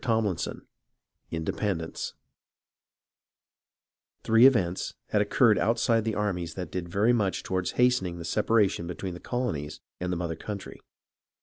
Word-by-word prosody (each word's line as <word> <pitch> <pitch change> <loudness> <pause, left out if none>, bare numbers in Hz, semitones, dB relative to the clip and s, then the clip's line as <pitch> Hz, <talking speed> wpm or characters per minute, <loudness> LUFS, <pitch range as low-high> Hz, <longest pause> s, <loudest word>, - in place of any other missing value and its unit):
CHAPTER 110 -5 +2
X 85 - -3 0.8
INDEPENDENCE 80 +1 -3 2.1
Three 115 +3 +7
events 95 -9 0
had - - +2
occurred - - +4
outside 115 0 +2
the 110 - -1
armies 90 -5 -2
that 90 -1 -5
did 90 -2 -4
very 105 +7 +3
much 100 -5 0
toward 95 -1 -1
hastening 125 -9 +2
the 85 - -7
separation 105 -2 +2
between 90 +1 -5
the 85 - -8
colonies 80 - -3 0.2
and 90 0 -2
the 90 - -1
mother 85 -1 -2
country. 100 +4 -7
95 Hz, 130 wpm, -28 LUFS, 85-115 Hz, 2.1 s, Three